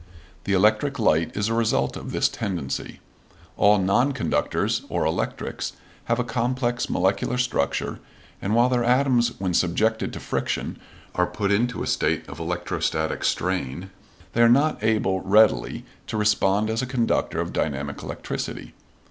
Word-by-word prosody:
The 100 Hz, -, 0 dB
electric 110 Hz, +9 st, +3 dB
light 80 Hz, -, +1 dB
is 105 Hz, 0 st, +1 dB
a 115 Hz, -, 0 dB
result 115 Hz, -12 st, +1 dB
of -, -, -7 dB
this -, -, +2 dB
tendency. 90 Hz, -11 st, -4 dB, 0.6 s
All 105 Hz, +1 st, +5 dB
non 105 Hz, +9 st, +2 dB
conductors, 130 Hz, -, 0 dB
or -, -, 0 dB
electrics, -, -, -2 dB, 0.3 s
have 115 Hz, -, +1 dB
a 125 Hz, -, +1 dB
complex 120 Hz, 0 st, -1 dB
molecular 95 Hz, +6 st, +1 dB
structure, 125 Hz, -, -1 dB, 0.4 s
and, 105 Hz, +3 st, 0 dB
while 120 Hz, +1 st, +5 dB
their 125 Hz, -1 st, +1 dB
atoms 125 Hz, -1 st, +3 dB
when 95 Hz, -2 st, -2 dB
subjected 110 Hz, +7 st, +1 dB
to -, -, -5 dB
friction -, -, -3 dB, 0.3 s
are 90 Hz, 0 st, +1 dB
put 100 Hz, +3 st, -2 dB
into 120 Hz, +4 st, +1 dB
a -, -, -3 dB
state -, -, 0 dB
of 70 Hz, +2 st, -9 dB
electrostatic 90 Hz, +1 st, -2 dB
strain, 90 Hz, 0 st, -1 dB, 0.4 s
they 115 Hz, -, +2 dB
are 115 Hz, -, +7 dB
not 140 Hz, 0 st, +3 dB
able 105 Hz, -4 st, +2 dB
readily 105 Hz, +3 st, +3 dB, 0.2 s
to -, -, -3 dB
respond 105 Hz, 0 st, +2 dB
as 110 Hz, +2 st, 0 dB
a 130 Hz, -, -3 dB
conductor 120 Hz, -3 st, 0 dB
of -, -, -3 dB
dynamic 70 Hz, -1 st, -2 dB
electricity. -, -, -5 dB
105 Hz, 150 wpm, -24 LUFS, 95-120 Hz, 0.6 s, are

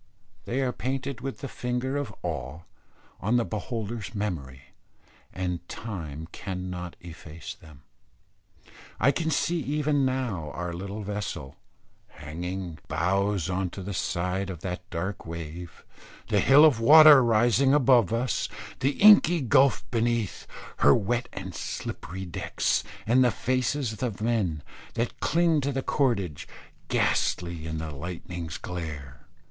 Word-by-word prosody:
They 130 Hz, +3 st, -1 dB
are 130 Hz, -2 st, +1 dB
painted 130 Hz, 0 st, -3 dB
with 135 Hz, +1 st, -5 dB
the 140 Hz, -, -4 dB
finger 125 Hz, +2 st, -3 dB
of 145 Hz, -7 st, -2 dB
awe 65 Hz, +6 st, -4 dB, 0.6 s
on 110 Hz, +5 st, +2 dB
the 120 Hz, -, +1 dB
beholder's 110 Hz, +1 st, -5 dB
memory, 70 Hz, -11 st, -4 dB, 0.7 s
and 90 Hz, -1 st, -4 dB
time 80 Hz, -8 st, -6 dB
cannot 90 Hz, -2 st, -5 dB
efface 80 Hz, -2 st, -9 dB
them. 75 Hz, -3 st, -17 dB, 1.2 s
I 140 Hz, -, +5 dB
can 160 Hz, +3 st, -1 dB
see 170 Hz, +3 st, +1 dB
even 145 Hz, 0 st, 0 dB
now 125 Hz, -, -1 dB
our 90 Hz, +1 st, -4 dB
little 100 Hz, +4 st, -5 dB
vessel, 100 Hz, -9 st, -5 dB, 0.5 s
hanging 85 Hz, +2 st, -6 dB
bows 95 Hz, +3 st, 0 dB
on 95 Hz, 0 st, -1 dB
to 95 Hz, +2 st, -8 dB
the 100 Hz, +2 st, -5 dB
side 90 Hz, +2 st, -1 dB
of 85 Hz, -4 st, -7 dB
that 90 Hz, -1 st, -5 dB
dark 95 Hz, +2 st, -4 dB
wave, 85 Hz, 0 st, -8 dB, 0.4 s
the 105 Hz, -2 st, +3 dB
hill 140 Hz, +9 st, +7 dB
of 140 Hz, -8 st, +4 dB
water 150 Hz, +2 st, +9 dB
rising 120 Hz, +4 st, +4 dB
above 130 Hz, -7 st, +5 dB
us, 120 Hz, +3 st, 0 dB, 0.3 s
the 135 Hz, +2 st, +1 dB
inky 200 Hz, -5 st, +7 dB
gulph 135 Hz, 0 st, +4 dB
beneath, 115 Hz, -3 st, -1 dB, 0.3 s
her 70 Hz, -, +6 dB
wet 120 Hz, +3 st, -1 dB
and 95 Hz, -1 st, -7 dB
slippery 95 Hz, +3 st, -5 dB
decks, 85 Hz, -, -1 dB, 0.2 s
and 125 Hz, +4 st, +4 dB
the 125 Hz, -, +5 dB
faces 130 Hz, 0 st, -1 dB
of 110 Hz, -, -11 dB, 0.2 s
the -, -, -6 dB
men 100 Hz, -10 st, 0 dB, 0.3 s
that 115 Hz, +1 st, -2 dB
cling 165 Hz, -2 st, +2 dB
to 140 Hz, +1 st, -1 dB
the 135 Hz, 0 st, -2 dB
cordage, 100 Hz, -, 0 dB, 0.4 s
ghastly 85 Hz, -2 st, 0 dB
in 80 Hz, 0 st, -3 dB
the 80 Hz, 0 st, -4 dB
lightning's 85 Hz, +1 st, -6 dB
glare. 75 Hz, -5 st, -7 dB
100 Hz, 135 wpm, -27 LUFS, 85-130 Hz, 1.2 s, water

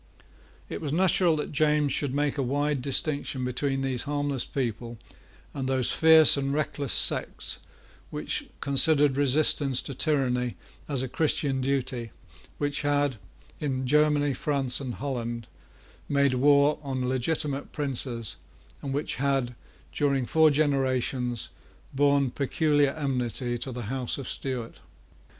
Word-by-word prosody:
It -, -, -6 dB
was 150 Hz, -3 st, -3 dB
natural 175 Hz, 0 st, +3 dB
that 150 Hz, -, -4 dB
James 150 Hz, -2 st, +2 dB
should 145 Hz, -3 st, -1 dB
make 145 Hz, +1 st, -1 dB
a -, -, +3 dB
wide 145 Hz, +2 st, 0 dB
distinction 140 Hz, -1 st, -1 dB
between 135 Hz, +2 st, -1 dB
these 130 Hz, -3 st, -1 dB
harmless 145 Hz, -3 st, -1 dB
people 120 Hz, -2 st, -4 dB, 0.6 s
and 135 Hz, -2 st, -3 dB
those 130 Hz, -2 st, +1 dB
fierce 160 Hz, -1 st, +6 dB
and 140 Hz, -1 st, -1 dB
reckless 145 Hz, -2 st, -2 dB
sects -, -, 0 dB, 0.5 s
which -, -, -4 dB
considered 145 Hz, 0 st, +4 dB
resistance 140 Hz, -1 st, +2 dB
to 140 Hz, -, -5 dB
tyranny 125 Hz, -4 st, 0 dB, 0.3 s
as 140 Hz, -3 st, -2 dB
a -, -, -2 dB
Christian 140 Hz, -1 st, 0 dB
duty 130 Hz, -3 st, -1 dB, 0.5 s
which 145 Hz, 0 st, -1 dB
had, 145 Hz, -3 st, +1 dB, 0.4 s
in 130 Hz, -4 st, -2 dB
Germany, 145 Hz, +1 st, +3 dB
France, 135 Hz, -2 st, -1 dB
and 130 Hz, -4 st, -5 dB
Holland, 120 Hz, -4 st, -4 dB, 0.6 s
made 140 Hz, -2 st, +3 dB
war 140 Hz, +3 st, +4 dB
on 130 Hz, -3 st, -3 dB
legitimate 140 Hz, +2 st, -1 dB
princes, 125 Hz, -6 st, -3 dB, 0.4 s
and 135 Hz, -1 st, -3 dB
which 145 Hz, -4 st, -2 dB
had, 135 Hz, -2 st, 0 dB, 0.4 s
during 140 Hz, -3 st, +1 dB
four 160 Hz, +4 st, +4 dB
generations, 130 Hz, -4 st, 0 dB, 0.4 s
borne 140 Hz, -1 st, +3 dB
peculiar 145 Hz, +1 st, +1 dB
enmity 125 Hz, -4 st, -1 dB
to 130 Hz, +2 st, -4 dB
the 120 Hz, -1 st, -5 dB
House 125 Hz, +3 st, -2 dB
of 135 Hz, -, -6 dB
Stuart. 125 Hz, -4 st, -4 dB
140 Hz, 130 wpm, -27 LUFS, 130-145 Hz, 0.6 s, fierce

